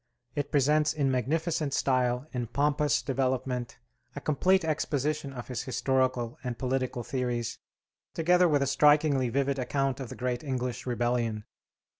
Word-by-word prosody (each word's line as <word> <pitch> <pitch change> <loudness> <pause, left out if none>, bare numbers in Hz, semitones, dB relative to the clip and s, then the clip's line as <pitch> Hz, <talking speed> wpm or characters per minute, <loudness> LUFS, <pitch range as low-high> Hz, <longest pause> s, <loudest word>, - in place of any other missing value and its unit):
It 145 -1 -3
presents 150 +2 +3
in 140 -3 +1
magnificent 150 +3 0
style, 125 -1 +1
in 120 -2 -2
pompous 145 +4 +1
development, 130 -2 -1 0.4
a - - -4
complete 180 +5 +2
exposition 150 -1 -1
of 125 -3 -8
his 125 -2 -3
historical 130 -1 0
and 125 -2 -4
political 130 -1 -2
theories, 120 -2 -2 0.6
together 180 +2 +4
with 145 -2 +3
a - - +1
strikingly 145 -1 +4
vivid 140 +2 0
account 135 +1 -1
of 130 -3 -6
the - - -7
great 125 0 -2
English 125 -3 -3
rebellion. 120 -3 0
130 Hz, 140 wpm, -29 LUFS, 125-145 Hz, 0.6 s, together